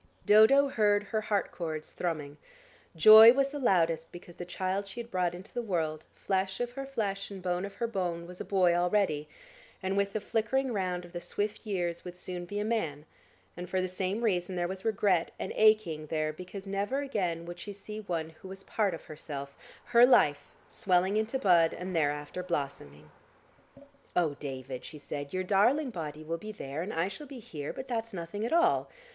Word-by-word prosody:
Dodo 220 +7 +7
heard 205 -5 +2
her 215 +1 -2
heart 205 -2 -1
cords 160 -3 -5
thrumming; 155 -4 -3 0.6
joy 220 +7 +10
was 275 +1 +1
the 290 - -4
loudest 165 - +2
because 175 0 -11
the 175 - -6
child 190 +3 -2
she 195 +5 -8
had 235 0 -7
brought 180 -1 0
into 185 +3 -11
the 245 - -1
world, 160 -8 -2
flesh 190 0 -1
of 245 0 -2
her 270 +2 -6
flesh 200 -7 -2
and 200 -1 -7
bone 180 0 -1
of 200 - -9
her 235 - -1
bone 180 -6 -2
was 180 +1 -9
a - - -2
boy 185 -3 +3
already, 175 -4 +1 0.5
and 190 +1 -1
with 200 0 0
the 215 - 0
flicking 240 +5 0
round 180 -3 -2
of 175 - -15
the 175 - -5
swift 210 +4 -3
years 175 -4 -2
would 180 -1 -8
soon 180 -1 -6
be 205 +4 -5
a 210 - -1
man, 160 -10 -2 0.5
and 180 0 -7
for 190 - 0
the 185 - 0
same 190 +4 -2
reason 185 -4 0
there 175 -1 0
was 190 +1 -6
regret 200 -6 +2
and - - -4
aching 215 -8 +3
there 155 0 -1
because 185 +4 -9
never 200 +8 -1
again 180 -12 -2
would 175 0 -8
she 205 - -6
see 210 +2 -8
one 170 -6 -3
who - - -9
was 195 +1 -9
part 205 -5 0
of - - -12
herself, 140 -2 -7 0.3
her 240 0 +5
life, 150 - +5 0.2
swelling 185 +1 +1
into 220 +4 0
bud, 175 -8 +4
and 180 +1 -5
thereafter 145 +2 -1
blossoming.... 135 - -5 1.0
"Oh, 165 -4 +2
David," 130 -2 -6
she 155 - -9
said, 145 -1 -6
"your 185 0 -1
darling 240 +9 +3
body 155 -5 -6
will 165 +2 -3
be 215 +3 -7
there, 150 -7 -5
and 190 +5 -4
I 165 +2 0
shall 240 +10 -8
be 270 -1 -9
here, 150 -10 -6
but 260 - -7
that's 230 -2 -3
nothing 175 +4 -5
at 230 - -2
all. 340 +3 +3
185 Hz, 200 wpm, -30 LUFS, 165-215 Hz, 1.0 s, joy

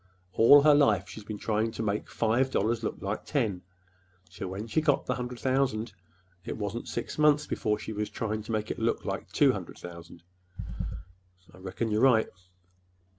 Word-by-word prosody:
All 140 +5 +7
her 150 0 +7
life 105 -10 +3
she's 100 +3 -9
been 105 0 -6
trying 110 +1 0
to 115 - -4
make 105 0 -2
five 120 +4 +1
dollars 115 -1 0
look - - -2
like 100 +2 -3
ten; 110 -11 -1 0.7
so 95 - -6
when 95 +4 -5
she 115 +8 0
got 150 -3 +2
the - - 0
hundred 125 -1 -5
thousand, 130 -4 0 0.5
it - - -5
wasn't 105 +2 -4
six 120 - -5
months 150 0 +4
before 105 -1 -1
she 110 - -6
was 105 0 -3
trying 110 -1 -3
to 110 - -7
make 110 -1 -1
that - - -4
look - - 0
like - - -4
two - - +4
hundred - - -7
thousand." 85 -1 -11 1.3
"I - - -15
reckon 95 +4 -3
you're 105 +1 +1
right." 125 -5 +4
110 Hz, 180 wpm, -28 LUFS, 105-125 Hz, 1.3 s, All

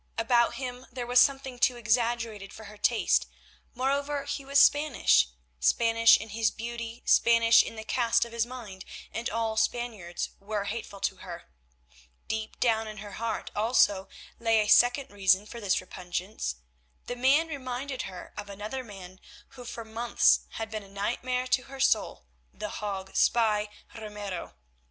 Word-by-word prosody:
About 235 +1 +3
him 250 0 -6
there 245 -1 -5
was 245 +1 +4
something 270 -2 +2
too 250 0 +3
exaggerated 230 -3 -1
for 220 - -11
her 210 0 -11
taste; 230 +2 +2 0.5
moreover 280 +3 -1
he 285 0 -4
was 275 +1 0
Spanish, 275 - +5 0.3
Spanish 230 - +5
in 220 - -8
his 220 +1 +1
beauty, 235 0 -7
Spanish 230 0 +6
in - - -6
the 220 - -7
cast 230 0 +2
of 235 - -11
his 230 -1 0
mind, 230 -6 -8 0.3
and 230 +1 -3
all 225 0 -1
Spaniards 220 -6 -2
were 205 0 -3
hateful 200 -1 -6
to - - -1
her. - - -10 0.8
Deep 220 0 -4
down 225 -2 +2
in 215 0 -8
her 205 0 -8
heart 225 +2 -4
also 205 -3 +2 0.3
lay 225 -1 +3
a 210 - -1
second 245 +5 +4
reason 195 0 +3
for 235 +2 -9
this 195 -3 +1
repugnance; 180 - -5 0.5
the 245 - -4
man 270 +6 +3
reminded 265 -2 -4
her 180 -1 -10
of 205 -1 -7
another 210 +6 -5
man 190 -4 -11 0.3
who 260 -2 -12
for 230 -1 -7
months 225 +1 +3
had 225 0 -5
been 215 -1 -4
a 200 - -15
nightmare 245 +5 -2
to 255 0 +1
her 270 0 -11
soul, 225 - +1 0.3
the 210 - -6
Hague 195 -2 -5
spy, 215 -3 +2 0.2
Ramiro. 210 - -7
230 Hz, 160 wpm, -28 LUFS, 210-245 Hz, 0.8 s, Spanish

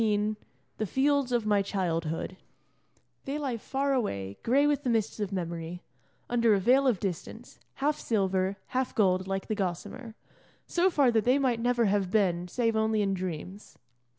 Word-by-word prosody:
XV 210 -1 +1 0.4
THE 215 - -1
FIELDS 275 +2 +1
OF 240 -3 +1
MY 205 -1 +3
CHILDHOOD 170 -3 -2 0.9
They 275 +2 -2
lie 270 -5 -2
far 275 +5 -1
away, 100 - -2
gray 275 +5 +3
with 290 -2 +2
the 255 - -2
mists 225 -2 0
of 205 -2 -2
memory, 170 -1 -4 0.4
under 235 -3 +3
a - - +1
veil 260 +7 +4
of 230 -8 +2
distance, 200 +5 -6 0.2
half 295 +2 0
silver, 190 -3 0
half 260 0 -1
gold, 185 -3 +2
like 195 0 -2
the - - -2
gossamer, 205 +4 -4 0.5
so 355 +2 +2
far 280 -8 +3
that 220 -2 +2
they 255 +3 +4
might 255 -4 +1
never 240 0 +2
have 200 -2 +1
been 180 -4 +1
save 230 +3 0
only 220 -1 +2
in 195 -1 0
dreams. 185 +2 -6
215 Hz, 170 wpm, -29 LUFS, 190-250 Hz, 0.9 s, veil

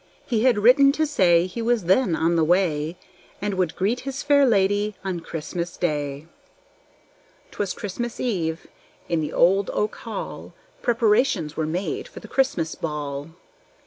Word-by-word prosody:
He 235 -1 0
had 250 -4 +4
written 255 +6 +6
to 310 +1 +1
say 175 - +3
he 185 +6 -5
was 230 -2 +1
then 185 +1 +3
on 165 +2 +1
the 165 - +3
way, 165 -2 +1 0.4
And 205 0 -2
would 185 -3 -1
greet 215 +7 0
his 275 +1 -5
fair 285 -1 +4
lady 205 -1 +2
on 185 -3 -3
Christmas 170 +2 -5
day. 145 -3 -2 1.3
'Twas 200 -2 -2
Christmas 235 +4 -5
eve. 170 -9 -2 0.4
In 170 -2 0
the 150 - -3
old 195 +3 +3
oak 210 0 -1
hall 225 - -7 0.3
Preparations 215 - +2
were 160 -1 -1
made 195 - -3
for - - -11
the - - -12
Christmas 190 - 0
ball. 145 -2 -4
190 Hz, 150 wpm, -23 LUFS, 165-235 Hz, 1.3 s, written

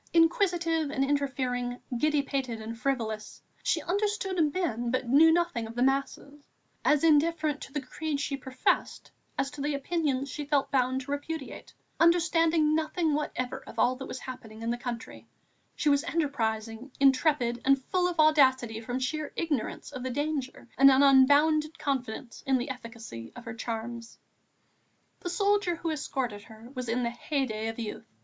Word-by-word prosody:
Inquisitive 335 -2 +2
and 275 -1 0
interfering, 260 -3 -1 0.2
giddy 300 +3 +2
pated 260 -5 -3
and 220 +1 -6
frivolous, 225 -4 -3 0.2
she - - 0
understood 385 -4 0
men 240 -10 -1
but 255 0 -1
knew 300 +6 +6
nothing 320 -9 0
of 225 - -10
the 245 - +2
masses; 275 +2 -2 0.3
as 295 0 +3
indifferent 310 -1 +3
to - - -8
the 295 - -2
creed 290 +3 -4
she 280 0 -2
professed 260 -1 -1 0.3
as 275 - -1
to 290 - -8
the 290 0 0
opinions 280 -2 -1
she 295 +2 -5
felt 285 -1 0
bound 260 -1 +1
to 270 - -7
repudiate, 285 0 -5 0.2
understanding 330 -2 +4
nothing 320 0 0
whatever 270 -4 -3
of - - -11
all 255 - +3
that 265 +1 -7
was - - -5
happening 225 -4 -9
in 230 - 0
the - - 0
country, 240 -2 -6 0.5
she - - -2
was 285 0 +4
enterprising, 235 -7 -2
intrepid, 265 -3 +3
and 275 0 +3
full 365 +3 +1
of 345 - -6
audacity 260 -7 +4
from 245 +2 -3
sheer 290 +4 -2
ignorance 300 -7 -2
of 260 -3 -6
danger 285 -3 -3
and 275 0 +9
an 270 +1 +5
unbounded 295 +4 +5
confidence 250 -3 -3
in 265 -1 +4
the 255 +2 -3
efficacy 230 - -9
of 245 - -10
her 225 - -5
charms. 230 0 -5 1.0
The 350 - -5
soldier 400 -1 +2
who 330 0 -3
escorted 265 -8 -3
her 225 +2 -13
was 255 -3 -5
in 245 +2 0
the 235 - 0
heyday 240 -4 -2
of 225 - -4
youth. 225 -3 -6
275 Hz, 165 wpm, -28 LUFS, 245-310 Hz, 1.0 s, and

